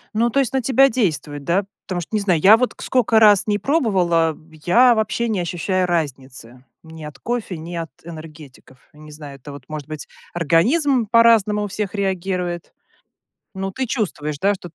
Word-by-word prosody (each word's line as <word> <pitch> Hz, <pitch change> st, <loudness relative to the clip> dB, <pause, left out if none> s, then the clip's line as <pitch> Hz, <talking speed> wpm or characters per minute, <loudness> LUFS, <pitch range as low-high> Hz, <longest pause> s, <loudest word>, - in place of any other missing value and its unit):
Ну, 235 Hz, +2 st, +2 dB
то 275 Hz, -, 0 dB
есть 270 Hz, -1 st, 0 dB
на 265 Hz, -, +1 dB
тебя 270 Hz, +2 st, +4 dB
действует, 150 Hz, -, -2 dB
да? 185 Hz, +6 st, 0 dB, 0.2 s
Потому 180 Hz, -2 st, -3 dB
что, -, -, -10 dB
не -, -, +2 dB
знаю, 185 Hz, -6 st, +1 dB
я 205 Hz, +7 st, +7 dB
вот 250 Hz, +2 st, -1 dB
к -, -, -13 dB
скока 235 Hz, -3 st, +2 dB
раз 210 Hz, -3 st, +6 dB
ни 205 Hz, -1 st, +1 dB
пробовала, 185 Hz, -, +1 dB
б 160 Hz, 0 st, -20 dB
я 240 Hz, +7 st, +5 dB
вообще 220 Hz, +2 st, -1 dB
не 210 Hz, -4 st, -1 dB
ощущаю 180 Hz, +2 st, -1 dB
разницы. 130 Hz, -6 st, -4 dB, 0.2 s
Ни 160 Hz, -1 st, -12 dB
от 150 Hz, -2 st, -9 dB
кофе, 225 Hz, -, -4 dB
ни 170 Hz, +2 st, -8 dB
от 165 Hz, -1 st, -4 dB
энергетиков. 155 Hz, -5 st, -12 dB, 0.2 s
Не 150 Hz, 0 st, -14 dB
знаю, 145 Hz, -2 st, -10 dB
это 145 Hz, +2 st, -11 dB
вот, 140 Hz, -2 st, -11 dB
может 155 Hz, -2 st, -6 dB
быть, 155 Hz, -2 st, -8 dB, 0.3 s
организм 225 Hz, -, +2 dB
по-разному 225 Hz, -2 st, +4 dB
у -, -, -3 dB
всех 205 Hz, 0 st, -4 dB
реагирует. 185 Hz, -3 st, -3 dB, 0.8 s
Ну, 195 Hz, 0 st, -4 dB
ты 260 Hz, +5 st, -3 dB
чувствуешь, 150 Hz, -, -3 dB
да, 200 Hz, +4 st, +2 dB
что 180 Hz, -2 st, -10 dB
т 165 Hz, -, -25 dB
180 Hz, 190 wpm, -20 LUFS, 155-220 Hz, 0.8 s, я